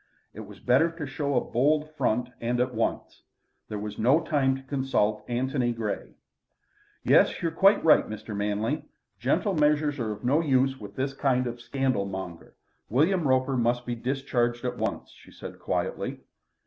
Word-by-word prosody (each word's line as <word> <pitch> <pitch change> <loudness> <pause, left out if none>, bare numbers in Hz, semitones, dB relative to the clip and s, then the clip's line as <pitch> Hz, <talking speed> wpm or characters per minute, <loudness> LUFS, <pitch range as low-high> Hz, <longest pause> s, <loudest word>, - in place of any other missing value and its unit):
It - - -10
was - - -10
better 135 +7 +3
to 165 -3 -5
show 140 +1 -2
a 125 - +3
bold 150 +5 +2
front 125 -4 0
and 120 +1 0
at 125 0 0
once. 115 0 -2 0.5
There 105 - -4
was 105 0 -6
no 130 +8 +4
time 145 -5 +1
to 135 - -9
consult 130 -6 0
Antony 125 0 0
Grey. 110 -3 -4 0.9
"Yes. - - +4
You're 165 - +1
quite 195 +5 +4
right, 160 - +5
Mr. 110 0 -6
Manley. 105 +7 -1 0.4
Gentle 205 -3 +1
measures 150 -2 +2
are 110 -3 -2
of 105 - -7
no 135 +5 +3
use 135 -3 +2
with 100 -1 -10
this 135 +1 -2
kind 130 -2 +1
of 120 0 -5
scandal 130 -5 -1
monger. 95 -3 -7 0.3
William 160 - +2
Roper 130 +1 +2
must 120 0 +1
be 120 - -2
discharged 120 -1 -1
at 125 -1 -3
once," - - -3
she - - -18
said - - -10
quietly. - - -3
130 Hz, 170 wpm, -27 LUFS, 120-140 Hz, 0.9 s, right